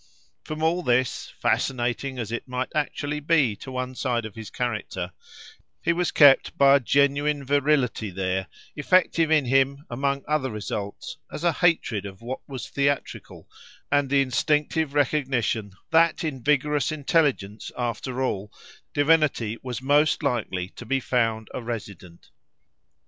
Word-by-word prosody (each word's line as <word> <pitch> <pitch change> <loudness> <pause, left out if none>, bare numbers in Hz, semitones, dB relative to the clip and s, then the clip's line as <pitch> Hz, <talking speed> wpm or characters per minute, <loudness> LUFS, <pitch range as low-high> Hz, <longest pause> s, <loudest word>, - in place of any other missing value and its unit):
From 155 0 -5
all 170 +3 +2
this, 125 -4 0
fascinating 130 +1 0
as 115 -3 -4
it 120 - -4
might 125 0 -3
actually 150 -1 -2
be 145 -7 +2
to 130 - -9
one 130 0 -3
side 120 -3 -1
of 110 - -8
his 110 0 -8
character, 105 -7 -3 0.7
he 170 - +1
was 175 +1 0
kept 145 -3 +5
by 140 0 +7
a - - +5
genuine 140 +2 +1
virility 140 -5 +1
there, 95 0 -2 0.3
effective 165 +1 +2
in 155 -3 +3
him, 135 +3 +2
among 140 +2 -1
other 150 -3 0
results, 105 -2 -5
as 155 - -6
a 170 - +4
hatred 125 - +1
of 95 -1 -11
what 125 +3 -4
was 130 -3 -6
theatrical, 140 0 -2 0.4
and 145 -1 +2
the 140 0 +4
instinctive 150 +3 0
recognition 125 -8 0 0.2
that 165 +1 +4
in 140 -5 -3
vigorous 150 +2 +1
intelligence, 140 -9 0
after 125 +1 -2
all, 105 -5 -2 0.4
divinity 145 -7 +2
was 125 -1 -5
most 150 +3 +3
likely 105 -9 -1
to - - -11
be 135 +3 0
found 115 -4 0
a - - -4
resident. 100 -7 -8
135 Hz, 145 wpm, -25 LUFS, 115-150 Hz, 0.7 s, by